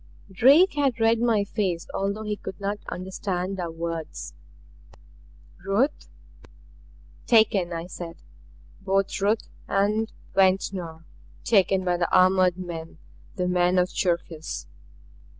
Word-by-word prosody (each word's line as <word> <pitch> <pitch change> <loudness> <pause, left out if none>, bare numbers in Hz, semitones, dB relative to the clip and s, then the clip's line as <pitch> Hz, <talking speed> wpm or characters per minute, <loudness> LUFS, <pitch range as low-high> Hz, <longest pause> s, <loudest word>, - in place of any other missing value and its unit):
Drake 280 - +6
had 280 -5 0
read 225 0 +3
my 225 -4 +3
face 190 -4 -2
although 200 +2 -2
he 210 -1 -2
could 190 -2 -8
not 200 +1 -2
understand 185 0 -4
our 175 -2 -3
words. 165 -1 -5 1.3
"Ruth 210 +10 0 0.6
" - - -26
"Taken," 210 -6 +4
I 165 0 -4
said. 175 -2 -8 0.6
"Both 195 0 0
Ruth 210 +3 +1 0.2
and 210 +3 +1 0.2
Ventnor. 185 -4 +1 0.4
Taken 195 -3 +3
by 175 -1 +1
the 175 -1 0
armored 185 -1 +4
men 165 -3 -7 0.4
the 180 -3 -1
men 180 0 +2
of 180 0 +3
Cherkis!" 170 -3 -2
190 Hz, 115 wpm, -25 LUFS, 175-210 Hz, 1.3 s, Drake